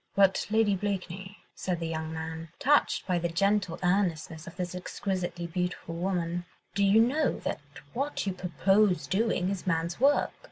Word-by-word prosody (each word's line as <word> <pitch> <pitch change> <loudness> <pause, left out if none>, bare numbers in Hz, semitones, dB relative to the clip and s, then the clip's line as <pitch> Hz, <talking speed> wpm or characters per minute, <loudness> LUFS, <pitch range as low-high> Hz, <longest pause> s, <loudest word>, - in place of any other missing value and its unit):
"But, 195 -1 +4
Lady 215 -2 +3
Blakeney," 190 0 -4 0.2
said 180 -3 -2
the 165 - -3
young 160 -1 -3
man, 160 0 -5
touched 290 +2 +3
by 180 -2 +1
the 170 0 -1
gentle 195 0 +1
earnestness 175 -4 0
of 170 - -9
this 180 -1 -3
exquisitely 180 -1 -3
beautiful 180 -1 -3
woman, 175 0 -1 0.3
"do 200 - +1
you 200 +2 +6
know 260 +7 +2
that - - -2 0.3
what 275 +1 -2
you 195 - -1
propose 185 +2 +2
doing 195 -3 +1
is 195 -1 -5
man's 170 +1 0
work? 280 +3 +4
185 Hz, 160 wpm, -29 LUFS, 170-200 Hz, 0.3 s, you